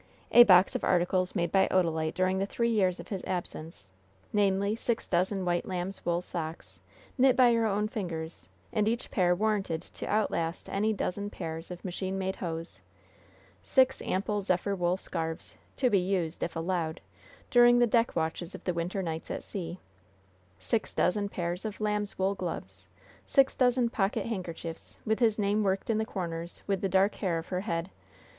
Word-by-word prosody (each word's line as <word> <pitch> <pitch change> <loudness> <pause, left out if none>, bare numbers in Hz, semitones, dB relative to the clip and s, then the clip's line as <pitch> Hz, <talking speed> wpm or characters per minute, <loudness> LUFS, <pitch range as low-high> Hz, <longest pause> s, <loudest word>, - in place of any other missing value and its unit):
A 240 - +9
box 185 -2 +6
of - - -3
articles 180 +1 +1
made 170 -3 0
by 190 -1 +4
Odalite 160 -4 +1
during 185 +1 +1
the 195 - 0
three 235 +2 0
years 190 -5 +2
of - - -9
his 195 -3 -4
absence 165 - -5 0.4
namely, 200 0 +2
six 230 0 -2
dozen 185 +2 0
white 175 -1 0
lambs' 185 +1 -3
wool 175 +1 0
socks, 165 -2 -6 0.4
knit 260 0 +6
by 245 -2 +6
her 230 -1 +2
own 210 +1 0
fingers, 165 - -5 0.2
and 210 0 +2
each 230 +2 -1
pair 180 -3 +3
warranted 200 -5 0
to - - -8
outlast 170 -5 -1
any 210 +2 +1
dozen 205 0 -2
pairs 165 -4 -6
of 180 +1 -8
machine 190 +1 -3
made 190 0 -2
hose; 165 -2 -5 0.8
six 260 -1 +3
ample 205 +2 -1
zephyr 190 +1 0
wool 175 0 +1
scarfs, 165 -3 -4 0.2
to 260 - +2
be 200 - +5
used 180 -3 -1
if 170 - -2
allowed 165 -1 -1 0.5
during 240 0 +7
the 240 - +5
deck 235 0 +2
watches 165 +2 -2
of - - -10
the 180 - -1
winter 175 +3 -2
nights 160 -2 -4
at - - -4
sea; 175 -3 -5 0.8
six 210 - -2
dozen 200 +2 +1
pairs 175 -1 -3
of 215 -2 -5
lambs' 210 -1 -1
wool 190 +1 +1
gloves, 95 - -6 0.4
six 270 -1 +4
dozen 250 -1 +3
pocket 205 -4 0
handkerchiefs, 170 -6 -6
with 220 0 +1
his 225 -3 +3
name 205 0 +1
worked 195 +2 0
in 220 - +1
the 220 - 0
corners 170 -4 -5
with 195 -2 -1
the 195 - 0
dark 190 +2 +3
hair 180 -5 -1
of 165 - -6
her 180 -1 -1
head. 170 -2 -3
190 Hz, 180 wpm, -29 LUFS, 170-210 Hz, 0.8 s, A